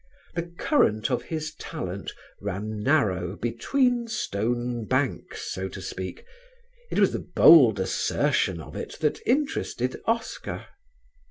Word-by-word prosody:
The 170 0 -4
current 110 - +2
of 125 - +1
his 155 -1 -4
talent 100 - -5 0.3
ran 100 +2 -4
narrow 100 - +1
between 240 - +1
stone 120 - -2
banks, - - -1
so 95 +1 -3
to 95 - -8
speak; 95 0 -6 0.6
it - - -3
was - - +4
the - - -1
bold 125 - +7
assertion 95 -1 +1
of 75 - -10
it - - -6
that 150 -2 +1
interested 255 - 0
Oscar. 230 0 -2
120 Hz, 120 wpm, -26 LUFS, 100-165 Hz, 0.6 s, bold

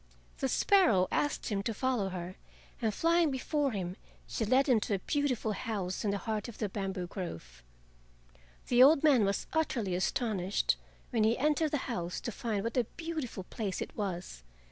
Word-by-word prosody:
The 270 - 0
sparrow 290 - +4
asked 290 - 0
him 200 -2 0
to 220 +2 -3
follow 245 -5 0
her, 180 0 -6 0.5
and 220 -2 +2
flying 335 +6 +3
before 280 +2 0
him 185 -3 -4 0.3
she - - -3
led 260 +6 +3
him 250 -5 +5
to 210 -1 -1
a - - 0
beautiful 255 0 0
house 200 -4 -3
in 210 - +1
the 200 - 0
heart 215 +1 -3
of 235 - -9
the 215 - -1
bamboo 190 -2 -3
grove. 80 - -7 1.1
The 245 0 +5
old 280 +3 +7
man 270 -9 +5
was 200 0 -1
utterly 245 - 0
astonished 190 +1 0 0.4
when 230 -4 +2
he 220 +2 +3
entered 300 +3 +2
the 295 - 0
house 180 -8 -3
to 235 - -3
find 210 -2 -2
what 230 +3 -3
a 245 - +3
beautiful 315 - -4
place 195 0 -4
it - - -5
was. 180 - -4
220 Hz, 180 wpm, -31 LUFS, 195-265 Hz, 1.1 s, old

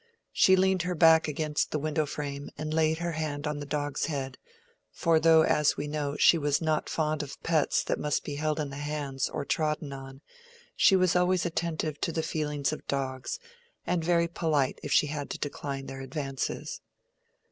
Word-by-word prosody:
She 190 - +6
leaned 190 0 +2
her 180 +1 -2
back 160 -1 +6
against 150 0 -1
the - - -1
window 155 0 -1
frame, 140 -1 -5
and 155 0 -3
laid 160 0 +2
her 170 +1 -2
hand 150 -2 -3
on 150 -1 -2
the 145 - -6
dog's 145 0 -1
head; 135 -4 -4 0.5
for 165 -2 +2
though, 160 0 +6
as 150 -2 +2
we 150 - -3
know, 145 -1 -2
she 170 - +6
was 145 -1 +1
not 155 -2 0
fond 155 -1 0
of 140 -2 -8
pets 160 -4 +2
that - - -2
must 150 -1 -1
be 145 - -5
held 155 +1 -1
in 145 -2 -3
the 140 - -7
hands 145 -2 -3
or 150 -2 -4
trodden 150 -2 -1
on, 135 0 -9 0.5
she 195 - +5
was 185 -2 +3
always 180 0 +2
attentive 160 -3 -2
to - - 0
the 160 0 -2
feelings 150 -3 -1
of - - -8
dogs, 130 -2 -2 0.5
and 175 -2 0
very 170 0 +3
polite 155 -5 0
if 145 - -6
she - - +5
had 145 -1 -4
to - - -4
decline 140 -1 -4
their 135 0 -7
advances. 135 -1 -4
150 Hz, 190 wpm, -28 LUFS, 145-160 Hz, 0.5 s, She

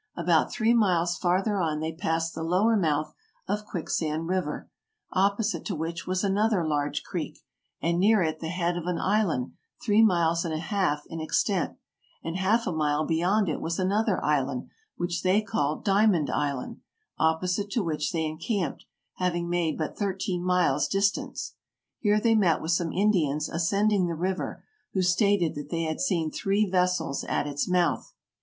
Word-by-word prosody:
About 170 -2 +2
three 230 0 +2
miles 175 -6 +2
farther 190 +4 +1
on 155 -4 0
they 160 +1 -2
passed 165 -1 -1
the 160 - -5
lower 185 +8 +2
mouth 155 -6 0 0.3
of 210 0 -2
Quicksand 160 -3 -2
River, 180 -5 -2 0.5
oppo 200 +3 +2
site 215 - -2
to 195 - -2
which 165 +3 -4
was 185 +1 0
another 205 -2 +2
large 145 -2 -1
creek, - - -5 0.5
and 170 +1 +1
near 205 0 +4
it 155 -1 -2
the 160 - -4
head 175 0 -1
of 175 0 -5
an 180 -1 0
island 190 -11 0 0.3
three 215 -1 +3
miles 170 -5 +3
and 165 -3 -2
a - - -1
half 165 -4 -1
in 165 -1 -6
extent, 180 +3 0 0.5
and 165 - -4
half 215 +5 +2
a - - -1
mile 155 -1 0
beyond 185 +5 +2
it 155 - -2
was 165 +1 -2
another 200 +1 +1
island, 135 -4 0 0.3
which 175 0 -2
they 185 +3 +3
called 155 -8 -2
Diamond 195 -6 +3
Island, 140 -3 -2 0.4
opposite 180 +5 +1
to 220 +1 0
which 155 -3 -1
they 160 -2 -1
encamped, 160 - -3 0.3
having 175 -1 -1
made 175 -2 0
but 155 - -3
thirteen 190 -3 -2
miles' 180 -6 +2
distance. 195 0 -1 0.5
Here 210 -1 +3
they 225 +1 +3
met 185 -8 +3
with 160 - -2
some 165 -1 +1
Indians 160 -7 +1
ascending 195 +3 +1
the 170 - -2
river, 185 +3 -3 0.3
who 190 - +1
stated 180 -1 +2
that 145 -2 -7
they 165 -1 -1
had 155 -1 -3
seen 170 - 0
three 200 +2 +1
vessels 180 -5 0
at - - -1
its 145 +4 -2
mouth. 175 -3 +1
175 Hz, 170 wpm, -27 LUFS, 160-200 Hz, 0.5 s, near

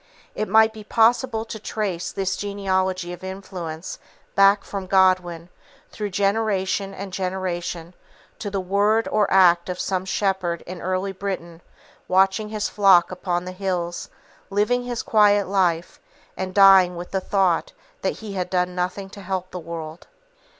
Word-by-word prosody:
It 215 - -3
might 220 +1 +5
be 215 -1 -10
possible 225 +1 +2
to 220 -1 -7
trace 200 -5 -3
this 190 -1 -2
genealogy 190 -3 -1
of 175 - -11
influence 185 -4 -7 0.3
back 195 0 +5
from 195 -2 -6
Godwin, 180 -3 +2 0.4
through 210 -1 -4
generation 195 -1 0
and 195 -1 -8
generation, 180 -2 -3 0.5
to 205 - -4
the 200 -1 -2
word 205 +4 +1
or 210 -2 +1
act 175 -2 +5
of 180 - -4
some 185 -1 -1
shepherd 190 -3 -1
in 180 0 -8
early 185 +2 -1
Britain, 180 -3 -5 0.5
watching 190 +3 +2
his 215 -1 -2
flock 195 -4 +4
upon 180 -1 -2
the 185 - -5
hills, 180 -2 -3 0.4
living 210 +5 +1
his 240 -1 -3
quiet 205 -2 +4
life, 180 -4 0 0.4
and 185 0 -5
dying 195 -3 +7
with 175 +1 -8
the 190 - -1
thought 185 -4 +1 0.3
that 190 - -2
he 215 -2 -7
had 180 -2 -3
done 180 -1 0
nothing 185 +2 -3
to 200 - -10
help 185 -1 -4
the 180 - -5
world. 165 -1 -8
190 Hz, 150 wpm, -23 LUFS, 180-200 Hz, 0.5 s, dying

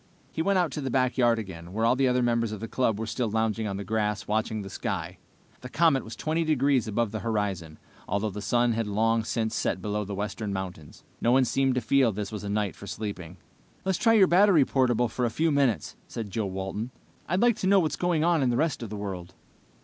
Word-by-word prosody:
He 160 - -2
went 195 +3 +2
out 175 -3 +1
to 150 - -4
the 135 - -2
backyard 125 -2 +2
again, 90 -5 -7
where 110 +2 0
all 115 - +4
the 135 0 +2
other 125 0 +2
members 115 -2 +1
of 110 - -5
the 115 - -5
club 115 -3 0
were 110 - -2
still 115 +1 -2
lounging 110 0 0
on 100 -1 -3
the 100 - -4
grass, 105 0 -1
watching 110 0 -1
the 95 - -8
sky. - - -4 0.4
The 125 - -9
comet 155 -4 +3
was 110 - -8
twenty 160 +2 -1
degrees 140 -6 +2
above 110 0 0
the 110 - -3
horizon, 100 -8 -2 0.3
although 100 +1 -1
the 105 +2 -6
sun 120 +2 +2
had 115 -1 -1
long 110 +2 +1
since 110 0 -2
set 95 - -1
below 105 +2 -2
the 100 0 -5
western 105 +1 -3
mountains. 90 -6 -6 0.2
No 120 - +3
one 130 +1 +5
seemed 135 +1 +1
to 125 - +1
feel 125 +1 +3
this 105 0 -5
was 105 -2 -6
a 100 - -4
night 105 -1 -1
for 100 - -11
sleeping. 95 -6 -6 0.5
"Let's 190 -2 0
try 225 - +4
your 210 -4 +7
battery 180 -4 +5
portable 120 -3 +2
for 125 +2 -3
a 120 - +2
few 160 +7 +1
minutes," 135 - +1
said 110 -4 -6
Joe 110 0 -1
Walton. 95 +4 -4 0.4
"I'd 180 +3 +1
like 240 -3 +4
to 190 - -1
know 195 0 +6
what's 160 -4 0
going 175 -3 +1
on 170 -2 +3
in 130 - +2
the 120 - +1
rest 155 -1 0
of 115 - -5
the 105 - -5
world." 95 -3 -6
115 Hz, 240 wpm, -27 LUFS, 105-135 Hz, 0.5 s, your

